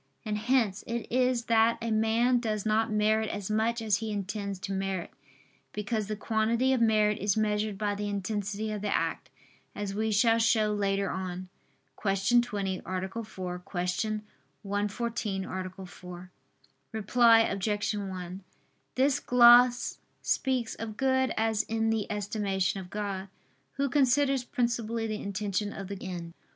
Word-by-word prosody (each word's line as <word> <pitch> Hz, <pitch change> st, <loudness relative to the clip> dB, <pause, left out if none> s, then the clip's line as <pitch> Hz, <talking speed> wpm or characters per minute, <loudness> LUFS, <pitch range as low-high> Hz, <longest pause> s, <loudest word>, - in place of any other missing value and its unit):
And 215 Hz, -1 st, -1 dB
hence 220 Hz, -4 st, +1 dB
it 235 Hz, 0 st, -3 dB
is 250 Hz, -1 st, +2 dB
that 230 Hz, 0 st, +4 dB
a 230 Hz, -1 st, -3 dB
man 225 Hz, +3 st, +3 dB
does 215 Hz, -3 st, -2 dB
not 220 Hz, +1 st, +2 dB
merit 215 Hz, +1 st, +2 dB
as 205 Hz, 0 st, -4 dB
much 225 Hz, +2 st, +1 dB
as 210 Hz, -3 st, +2 dB
he 220 Hz, +1 st, -4 dB
intends 200 Hz, 0 st, -3 dB
to 195 Hz, -, -4 dB
merit: 190 Hz, -2 st, -2 dB, 0.6 s
because 210 Hz, 0 st, -2 dB
the 215 Hz, -, -2 dB
quantity 230 Hz, +4 st, +1 dB
of 255 Hz, -, +1 dB
merit 215 Hz, -2 st, +3 dB
is 200 Hz, +1 st, +1 dB
measured 210 Hz, -1 st, 0 dB
by 205 Hz, 0 st, 0 dB
the 205 Hz, 0 st, -3 dB
intensity 205 Hz, +1 st, -3 dB
of 210 Hz, -1 st, -4 dB
the 210 Hz, -, -2 dB
act, 165 Hz, -5 st, -1 dB, 0.5 s
as 205 Hz, -1 st, -3 dB
we 220 Hz, +2 st, -1 dB
shall 225 Hz, +2 st, +4 dB
show 220 Hz, -2 st, +3 dB
later 200 Hz, -1 st, 0 dB
on 185 Hz, 0 st, -5 dB, 0.5 s
(Q. 195 Hz, +4 st, +3 dB
20, 200 Hz, -5 st, -3 dB
A. 190 Hz, +4 st, -4 dB
4; 185 Hz, -4 st, -6 dB
Q. 180 Hz, +4 st, -2 dB, 0.4 s
114, 205 Hz, 0 st, -2 dB
A. 185 Hz, 0 st, -6 dB
4). 180 Hz, 0 st, -11 dB, 0.6 s
Reply 225 Hz, +2 st, +5 dB
Obj. 205 Hz, 0 st, 0 dB
1: 185 Hz, -2 st, -5 dB, 0.5 s
This 270 Hz, +2 st, +3 dB
gloss 245 Hz, -1 st, +6 dB, 0.2 s
speaks 255 Hz, -4 st, 0 dB
of 220 Hz, -1 st, -7 dB
good 260 Hz, -1 st, +2 dB
as 220 Hz, -1 st, +2 dB
in 225 Hz, 0 st, 0 dB
the 220 Hz, -2 st, -1 dB
estimation 200 Hz, -2 st, -1 dB
of 180 Hz, -1 st, -9 dB
God, 200 Hz, -1 st, -4 dB, 0.5 s
Who 280 Hz, -, 0 dB
considers 275 Hz, 0 st, +3 dB
principally 235 Hz, -2 st, -1 dB
the 215 Hz, -1 st, -3 dB
intention 205 Hz, 0 st, -2 dB
of 195 Hz, -1 st, -7 dB
the 200 Hz, -1 st, -6 dB
end. 175 Hz, -3 st, -6 dB
210 Hz, 150 wpm, -29 LUFS, 195-230 Hz, 0.6 s, gloss